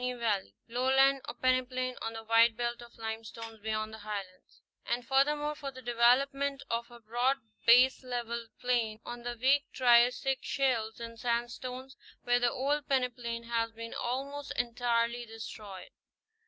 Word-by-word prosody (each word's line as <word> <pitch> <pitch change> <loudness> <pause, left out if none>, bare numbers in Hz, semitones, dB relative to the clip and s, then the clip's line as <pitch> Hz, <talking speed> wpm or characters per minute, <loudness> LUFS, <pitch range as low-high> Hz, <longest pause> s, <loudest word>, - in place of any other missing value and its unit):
Kittatinny 250 -1 -2
Valley 200 - -1
lowland 265 +3 +3
or - - -6
peneplain 255 0 0
on 225 - -3
the 225 0 -7
wide 230 0 +4
belt 240 0 -2
of 235 0 -14
limestones 225 0 -6
beyond 215 0 -3
the 220 - -8
Highlands; 200 -3 -7 0.2
and 240 +1 -2
furthermore 295 +2 +2
for 290 -2 -6
the 260 -1 -11
development 270 +4 +2
of 235 +1 -1
a 240 0 -13
broad 240 +4 +1 0.3
baselevelled 240 -1 +3
plain 235 -3 0
on 240 0 -6
the 240 0 -5
weak 275 +3 +4
Triassic 250 +2 +4
shales 235 -5 0
and 230 -1 -8
sandstones, 250 +2 -3 0.3
where 245 0 +3
the 245 0 +3
old 285 +4 -1
peneplain 245 -3 -1
has 230 -1 -1
been 230 0 -7
almost 275 +4 -3
entirely 235 0 0
destroyed. 215 -3 -9
240 Hz, 145 wpm, -31 LUFS, 230-255 Hz, 0.3 s, wide